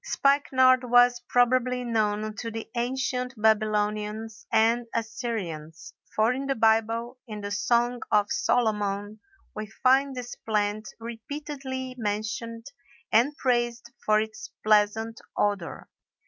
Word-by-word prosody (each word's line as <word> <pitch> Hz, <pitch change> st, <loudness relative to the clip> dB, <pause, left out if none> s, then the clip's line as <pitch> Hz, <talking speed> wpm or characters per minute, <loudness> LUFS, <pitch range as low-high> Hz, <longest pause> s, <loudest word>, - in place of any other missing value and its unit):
Spikenard 265 Hz, -, +3 dB
was 245 Hz, 0 st, +5 dB
probably 250 Hz, 0 st, +2 dB
known 215 Hz, -2 st, -1 dB
to 230 Hz, -, -4 dB
the 225 Hz, 0 st, -6 dB
ancient 250 Hz, +1 st, -2 dB
Babylonians 215 Hz, 0 st, 0 dB
and 230 Hz, +2 st, +3 dB
Assyrians, 210 Hz, -9 st, -4 dB, 0.2 s
for 220 Hz, +3 st, +3 dB
in 270 Hz, +2 st, -4 dB
the 275 Hz, -, 0 dB
Bible, 225 Hz, +2 st, +1 dB
in 210 Hz, -2 st, -6 dB
the 200 Hz, 0 st, -5 dB
Song 240 Hz, +4 st, +1 dB
of 205 Hz, -1 st, +2 dB
Solomon, 210 Hz, -2 st, 0 dB, 0.4 s
we 215 Hz, 0 st, -5 dB
find 265 Hz, +5 st, +2 dB
this 245 Hz, -1 st, -6 dB
plant 210 Hz, 0 st, -1 dB
repeatedly 260 Hz, +2 st, -6 dB
mentioned 225 Hz, +2 st, -3 dB, 0.5 s
and 255 Hz, +7 st, +3 dB
praised 240 Hz, -2 st, 0 dB
for 215 Hz, 0 st, +4 dB
its 220 Hz, 0 st, -5 dB
pleasant 215 Hz, +1 st, +2 dB, 0.2 s
odor. 200 Hz, -5 st, -1 dB
225 Hz, 115 wpm, -27 LUFS, 215-250 Hz, 0.5 s, was